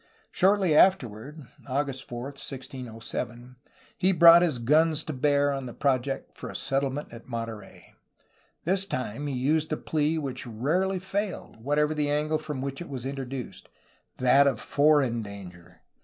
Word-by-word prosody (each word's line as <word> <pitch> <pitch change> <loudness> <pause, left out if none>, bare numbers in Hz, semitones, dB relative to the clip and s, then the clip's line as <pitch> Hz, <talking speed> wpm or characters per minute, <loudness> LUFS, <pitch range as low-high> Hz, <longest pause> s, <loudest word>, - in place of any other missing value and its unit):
Shortly 190 -2 +3
afterward^ 150 - +2 2.5
he 190 0 +4
brought 170 -1 +8
his 165 -7 +2
guns 155 +6 +3
to 155 - -5
bear 145 +1 +2
on 135 -1 -4
the 120 - -8
project 135 -1 -1
for - - -7
a - - -9
settlement 135 0 -2
at 115 - -11
Monterey. 115 -4 -7 0.7
This 190 +3 +1
time 130 - -4
he 140 - -3
used 150 +5 +1
the 155 - -1
plea 155 +1 0
which 130 -5 -4
rarely 160 - 0
failed, 190 - -4
whatever 145 +6 +1
the 150 -1 0
angle 150 +1 0
from 150 -4 -5
which 135 +2 -4
it 175 - -7
was 130 -3 -6
introduced, 135 -2 -6 0.3
— - - -41
that 135 +3 +5
of 135 - +1
foreign 140 -5 +2
danger. 90 -4 -11
140 Hz, 140 wpm, -27 LUFS, 125-155 Hz, 2.5 s, brought